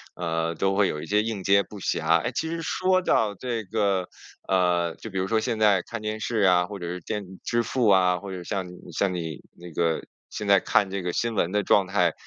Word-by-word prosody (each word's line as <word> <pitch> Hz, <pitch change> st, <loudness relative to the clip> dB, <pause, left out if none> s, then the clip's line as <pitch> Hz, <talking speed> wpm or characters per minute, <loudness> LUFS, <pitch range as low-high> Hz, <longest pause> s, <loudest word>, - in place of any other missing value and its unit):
呃， 85 Hz, -1 st, -2 dB
都 95 Hz, +4 st, 0 dB
会 100 Hz, -1 st, +4 dB
有 75 Hz, -, -3 dB
一 -, -, -6 dB
些 105 Hz, +1 st, +2 dB
应 110 Hz, -4 st, -4 dB
接 100 Hz, +1 st, +4 dB
不 105 Hz, +2 st, -11 dB
暇。 80 Hz, -2 st, +2 dB
哎， -, -, -2 dB
其 160 Hz, -, -2 dB
实 165 Hz, 0 st, -3 dB
说 185 Hz, +3 st, +1 dB
到 110 Hz, -, +1 dB
这 120 Hz, 0 st, -3 dB
个， 100 Hz, -3 st, 0 dB, 0.4 s
呃， 90 Hz, -3 st, +2 dB
就 115 Hz, -, -9 dB
比 95 Hz, -, -5 dB
如 95 Hz, -, -1 dB
说 110 Hz, +2 st, +2 dB
现 115 Hz, -1 st, -2 dB
在 105 Hz, -4 st, +4 dB
看 115 Hz, -2 st, -7 dB
电 110 Hz, 0 st, -3 dB
视 115 Hz, 0 st, -2 dB
啊， 90 Hz, -3 st, +4 dB
或 100 Hz, +1 st, -8 dB
者 85 Hz, -, -5 dB
是 90 Hz, +1 st, -4 dB
电 105 Hz, +3 st, -4 dB
子 95 Hz, 0 st, -13 dB
支 120 Hz, 0 st, 0 dB
付 120 Hz, -1 st, 0 dB
啊， 90 Hz, -2 st, +4 dB
或 100 Hz, -1 st, -8 dB
者 90 Hz, -2 st, -6 dB
像 95 Hz, 0 st, -3 dB
你 90 Hz, 0 st, -11 dB
像 95 Hz, +3 st, 0 dB
你 80 Hz, -4 st, -5 dB, 0.2 s
那 85 Hz, -1 st, -10 dB
个， 80 Hz, 0 st, 0 dB, 0.3 s
现 105 Hz, -, -5 dB
在 100 Hz, -1 st, +6 dB
看 100 Hz, +1 st, +2 dB
这 95 Hz, 0 st, -3 dB
个 90 Hz, 0 st, -2 dB
新 115 Hz, -1 st, -1 dB
闻 85 Hz, -, +1 dB
的 105 Hz, +1 st, +1 dB
状 95 Hz, 0 st, +3 dB
态， 100 Hz, +1 st, +2 dB
95 Hz, 265 characters per minute, -25 LUFS, 90-110 Hz, 0.4 s, 在